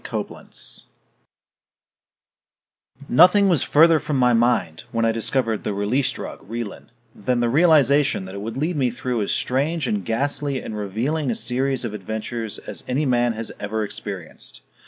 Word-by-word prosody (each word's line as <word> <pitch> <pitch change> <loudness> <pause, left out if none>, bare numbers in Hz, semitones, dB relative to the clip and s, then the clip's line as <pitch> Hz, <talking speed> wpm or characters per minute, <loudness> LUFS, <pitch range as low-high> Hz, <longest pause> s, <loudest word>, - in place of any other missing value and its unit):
COBLENTZ - - -6 2.2
I - - -10
Nothing 185 +4 +6
was 165 -8 +3
further 160 +1 +5
from 150 -2 -2
my 125 -1 +4
mind, 115 -9 +1
when 115 0 +1
I 115 - +3
discovered 115 0 -1
the 105 - -2
"Release 125 +7 +1
Drug" - - -7
Relin, 115 -2 -6 0.3
than 120 +4 -1
the 120 -1 +1
realization 145 - +4
that 95 - -8
it 100 - -6
would 115 +3 -5
lead 155 +4 -1
me 130 -3 +2
through 125 -1 -2
as 100 - -1
strange 145 +4 0
and 105 -5 -1
ghastly 140 +5 -1
and 110 - -6
revealing 120 +9 -2
a 115 - 0
series 130 +1 -1
of 110 - -4
adventures 110 +2 -4
as - - -4
any 135 +4 0
man 120 -2 +2
has 115 0 -5
ever 110 +1 -2
experienced. 100 -4 -7
120 Hz, 160 wpm, -22 LUFS, 110-140 Hz, 2.2 s, Nothing